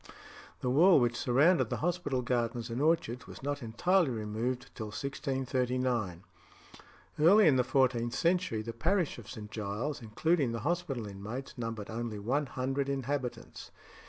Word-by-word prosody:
The 125 - 0
wall 170 +6 +6
which 120 -1 +1
surrounded 140 +9 +3
the - - -2
hospital 170 -8 -1
gardens 120 -1 -1
and 120 +4 -2
orchards 150 -6 +1
was - - -11
not 145 0 -2
entirely 165 +9 +2
removed 120 +3 -3
till 110 - -5
1639. 125 - -2 1.0
Early 195 +7 +7
in 145 - +5
the 125 - +3
fourteenth 125 -2 +1
century 170 -10 +1
the 115 +1 -5
parish 170 - 0
of 110 - -12
St. 105 -3 -8
Giles, 110 +8 -3
including 130 +4 +1
the 115 - -3
hospital 150 -5 -2
inmates, 105 +7 -7
numbered 115 -4 -5
only 115 -1 -4
one 135 +8 -1
hundred 135 +2 -2
inhabitants. 135 -1 -4
125 Hz, 145 wpm, -31 LUFS, 115-145 Hz, 1.0 s, Early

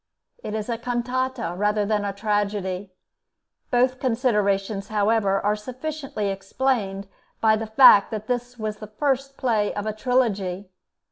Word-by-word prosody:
It 210 - -4
is 215 -1 -3
a 230 -2 -2
cantata 245 -3 -2
rather 210 +2 +1
than 210 0 0
a 200 - -1
tragedy. 200 -2 -2 0.8
Both 255 +1 +2
considerations, 210 -5 0
however, 210 -2 +2
are 205 +1 +1
sufficiently 255 -1 -4
explained 195 0 -1 0.3
by 220 -1 +4
the 220 0 -4
fact 220 -3 +7
that 215 -1 -5
this 245 +1 -3
was 215 -1 -4
the 215 - -9
first 275 +4 -1
play 220 -5 +1
of 205 0 -3
a 215 - -2
trilogy. 205 -6 0
215 Hz, 140 wpm, -24 LUFS, 200-245 Hz, 0.8 s, fact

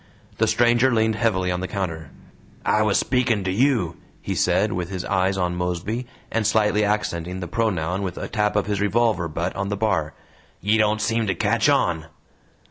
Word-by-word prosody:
The - - +3
stranger 120 +2 +3
leaned 110 -1 +2
heavily 105 -5 0
on 90 - -1
the 95 - -3
counter. 80 -7 -4 0.6
"I 105 - +3
was 105 -2 +2
speaking 120 -4 +1
to 95 - -1
YOU," 110 - +1 0.2
he - - -4
said, - - +1
with 90 -1 -3
his 95 -2 -4
eyes 95 0 +1
on 90 -1 0
Mosby, 90 +7 -3 0.2
and 110 -2 +1
slightly 105 -1 +2
accenting 95 -4 -1
the 90 - -5
pronoun 90 -3 -1
with 90 -3 -4
a - - -4
tap 105 -1 0
of 105 - +2
his 105 -1 -2
revolver 105 -4 +1
butt 85 +3 -3
on 100 +1 -2
the 100 - -2
bar. 110 +1 0 0.4
"Ye 105 +3 +2
don't 105 0 +2
seem 115 0 0
to 95 - 0
catch - - +2
on." 80 -2 +1
100 Hz, 190 wpm, -23 LUFS, 90-110 Hz, 0.6 s, The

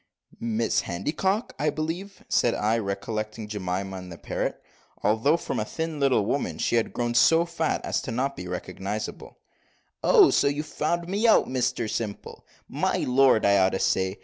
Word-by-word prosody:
'" - - -24
"Mrs 115 -1 0
Handycock, 190 - -1
I 150 - +2
believe," 170 +6 -5
said 120 - +2
I, 110 +2 +1
recollecting 110 +2 -4
Jemima 95 -2 -3
and 90 -1 -9
the 85 - -8
parrot, - - -3 0.4
although, 115 +10 +3
from - - -3
a 105 - -2
little 150 -6 +1
thin - - -4
woman, 140 +6 -1
she - - 0
had 115 - 0
grown 120 -1 -2
so 165 +8 +5
fat 170 -1 -2
as - - -2
not 135 +4 -1
to - - -7
be 90 - -7
recognisable. 95 +4 -5 0.7
"Oh! - - +6
so - - +3
you've 145 +2 -1
found 170 +3 -2
me 205 +5 +1
out, 225 - +5
Mr 125 -2 -1
Simple 105 -1 -5 0.2
my - - -1
lord, 130 -3 +4
I 100 0 +5
ought 95 0 +3
to 95 - -1
say. 95 0 0
115 Hz, 175 wpm, -26 LUFS, 100-150 Hz, 0.7 s, Oh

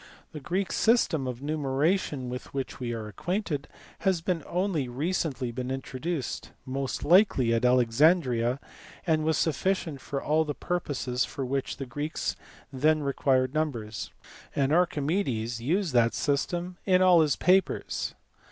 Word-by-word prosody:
The 155 - -7
Greek 180 +6 -2
system 175 - +2
of 125 +1 -5
numeration 145 0 0
with 125 +2 -7
which 135 -1 -4
we 120 -2 -3
are 110 -2 -4
acquainted 165 - -3 0.3
had 185 -4 0
been 175 -5 0
only 175 -6 0
recently 140 -2 -2
introduced, 130 +3 -4 0.2
most 135 0 -3
likely 160 - +5
at 115 - +1
Alexandria, 125 0 +3 0.5
and 160 -3 +2
was 160 -1 +2
sufficient 160 -2 0
for 140 +1 -3
all 155 +3 +2
the 150 -2 -4
purposes 135 -8 -1
for 135 - -4
which 135 +1 -2
the 135 - -4
Greeks 145 +5 -3 0.4
then 155 +3 +2
required 130 -1 +1
numbers; 120 -9 -2 0.5
and 140 +1 +2
Archimedes 145 - 0
used 170 - 0
that 115 -2 +3
system 175 +5 -1
in 185 -1 +4
all 180 -3 +7
his 150 -3 +2
papers. 185 +1 +1
145 Hz, 135 wpm, -28 LUFS, 130-170 Hz, 0.5 s, all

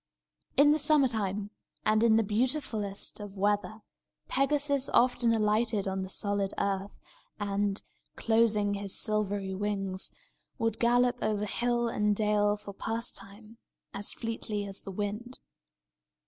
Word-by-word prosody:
In 290 +1 +7
the 305 - +3
summer 295 -2 +4
time, 205 -3 -2 0.3
and 215 0 +3
in 230 -1 +5
the 225 - +4
beautifullest 220 -3 -1
of 205 -1 -8
weather, 205 +2 0 0.5
Pegasus 280 0 +1
often 240 -1 +3
alighted 215 -1 +1
on 190 0 -1
the 190 - -5
solid 200 0 -1
earth, 195 0 -2 0.4
and, 200 0 -1 0.3
closing 220 -3 +2
his 200 -1 -2
silvery 205 -3 0
wings, 195 -1 -2 0.5
would 225 -1 -1
gallop 245 +1 +3
over 210 -1 0
hill 240 +3 0
and 210 -2 +1
dale 210 0 +2
for 205 -1 -9
pastime, 220 0 -5 0.3
as 200 - 0
fleetly 220 -2 -3
as 195 -1 -7
the - - -9
wind. 210 +5 -4
210 Hz, 130 wpm, -30 LUFS, 200-235 Hz, 0.5 s, In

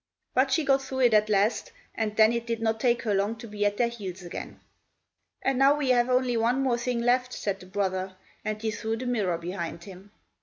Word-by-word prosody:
But 260 +1 +2
she 300 +3 +2
got 270 0 +3
through 265 0 -4
it 240 -3 +5
at 215 0 +4
last, 210 +2 +1 0.2
and 215 -2 -2
then 220 +1 +5
it 235 0 -3
did 230 -1 -2
not 225 0 0
take 240 0 +1
her 215 -3 0
long 200 +3 0
to 230 +1 -10
be 205 -1 0
at 205 0 -2
their 240 - +3
heels 195 -6 -7
again. 175 - -7 0.8
"And 270 -1 +1
now 275 +1 +6
we 285 -3 +1
have 240 0 +3
only 250 -1 +2
one 240 +4 +1
more 245 -3 +1
thing 240 -1 -1
left," 250 +1 +2
said 200 -2 -3
the 185 - -13
brother, 190 -1 -2 0.3
and 215 0 -3
he 220 0 -2
threw 220 +1 -3
the 255 - -5
mirror 210 -9 0
behind 170 -1 -5
him. 190 +1 -12
225 Hz, 230 wpm, -27 LUFS, 205-250 Hz, 0.8 s, now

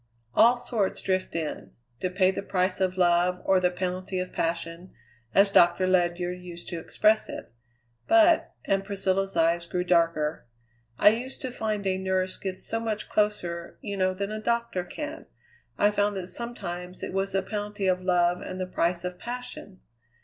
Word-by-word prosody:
All 240 - +6
sorts 220 -5 -1
drift 185 -2 -1
in 150 - -4 0.3
to 185 - -1
pay 185 +1 +3
the - - -4
price 185 -1 0
of 185 0 +1
love 180 0 +3
or 190 -1 +4
the 180 -1 +3
penalty 185 +1 -3
of 180 0 -3
passion, 165 +2 -3 0.4
as 195 0 +6
Doctor 175 0 +5
Ledyard 180 -1 +1
used 175 -1 -9
to 170 - -4
express 215 +6 +2
it; - - -8 0.5
but" 335 0 +5
and 195 0 +1
Priscilla's 195 -1 -1
eyes 170 +1 +2
grew 180 +1 -1
darker 165 -5 +1 0.5
"I - - +7
used 245 +5 -3
to 260 - -3
find 215 -4 -2
a 190 -1 +1
nurse 190 0 0
gets 190 -1 -4
so 225 - -1
much 220 -2 -3
closer, 180 -5 -1
you 200 -1 -4
know, 185 -1 +1
than 200 +2 -3
a 215 0 -4
doctor 235 -5 0
can 300 - -7 0.5
I 205 - +4
found 205 -1 +1
that 185 - -4
sometimes 180 -3 -5
it - - -4
was 195 0 -1
the 195 -1 +1
penalty 205 0 -4
of 185 -1 +2
love 180 -1 +2
and 185 - -6
the 185 - -1
price 175 -1 0
of 180 0 -5
passion. 245 -5 -7
185 Hz, 175 wpm, -27 LUFS, 180-205 Hz, 0.5 s, I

